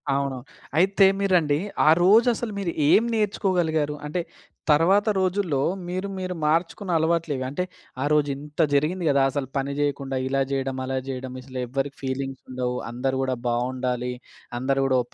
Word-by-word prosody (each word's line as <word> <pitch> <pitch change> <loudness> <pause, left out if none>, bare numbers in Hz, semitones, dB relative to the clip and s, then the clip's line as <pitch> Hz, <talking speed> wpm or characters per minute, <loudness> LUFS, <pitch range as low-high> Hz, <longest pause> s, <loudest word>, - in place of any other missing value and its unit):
అవును. 140 -1 -1 0.4
అయితే 195 +3 +5
మీరండి 175 -7 +3 0.3
ఆ - - +8
రోజు 220 +6 +6
అసలు 230 0 -4
మీరు 180 -4 -1 0.2
ఏం 225 - +6
నేర్చుకోగలిగారు? 180 -8 +1
అంటే 170 +4 -2 0.5
తర్వాత 190 +7 +4
రోజుల్లో 185 -5 +1 0.3
మీరు 185 +2 -3
మీరు 185 -1 -3
మార్చుకున్న 170 +3 0
అలవాట్లేవి? 160 -4 0
అంటే 145 +7 -2 0.4
ఆ - - 0
రోజు 150 -1 +3
ఇంత 150 +2 -12
జరిగింది 160 +6 +1
గదా! 140 -1 +3
అసలు 140 -1 -2
పని 135 +1 -1
జేయకుండా, 140 -2 -1
ఇలా 135 +1 +1
చేయడం, 135 -1 -1
అలా 130 0 -2
చేయడం. 130 -1 -5
అసలెవ్వరికి 130 +2 -4
ఫీలింగ్స్ 135 0 -3
ఉండవు. 125 -1 -2
అందరూ 130 +3 -1
గూడా 130 -1 0
బావుండాలి, 125 +1 -1 0.5
అందరు 135 +2 +1
గూడా 130 -1 +3
ఒ - - -20
145 Hz, 150 wpm, -24 LUFS, 130-180 Hz, 0.5 s, ఆ